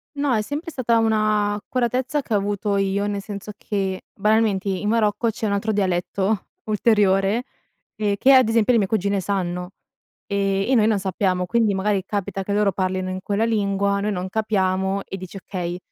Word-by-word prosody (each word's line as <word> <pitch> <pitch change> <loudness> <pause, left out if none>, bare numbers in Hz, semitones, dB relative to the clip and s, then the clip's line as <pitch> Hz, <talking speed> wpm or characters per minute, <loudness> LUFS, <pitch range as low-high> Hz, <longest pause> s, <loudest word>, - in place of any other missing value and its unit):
No, 285 -2 +1
è 220 - +2
sempre 290 +9 -5
stata 240 -5 +1
una 215 -2 +2
accuratezza 250 +6 -1
che 230 - -4
ho - - +4
avuto 205 0 -1
io, 195 +1 0
nel 205 -1 -2
senso 205 0 -7
che 195 -3 -3
banalmente 210 -1 +1
in 195 +1 -1
Marocco 225 0 +2
c'è 220 0 -4
un 205 - 0
altro 200 +2 0
dialetto, 195 +1 0 0.2
ulteriore, 210 0 +2 0.5
ehm, 205 -2 0
che 270 +7 +5
ad 255 -4 +6
esempio 225 +1 +3
le 230 - +4
mie 200 - +1
cugine 200 -1 0
sanno, 180 -2 -2 0.6
ehm, 195 +2 0
e - - +5
noi 215 -3 +4
non 220 -2 +2
sappiamo. 185 -1 0
Quindi 220 +2 +2
magari 195 0 0
capita 200 -1 -3
che 200 - -3
loro 205 -1 +3
parlino 185 0 -1
in 185 - -4
quella 205 +3 0
lingua, 200 -2 +1
noi 210 +1 0
non 185 -1 -3
capiamo 190 -2 0
e - - -5
dici: 185 +1 -8
"Okay, 180 -2 -4
205 Hz, 185 wpm, -22 LUFS, 195-220 Hz, 0.6 s, ad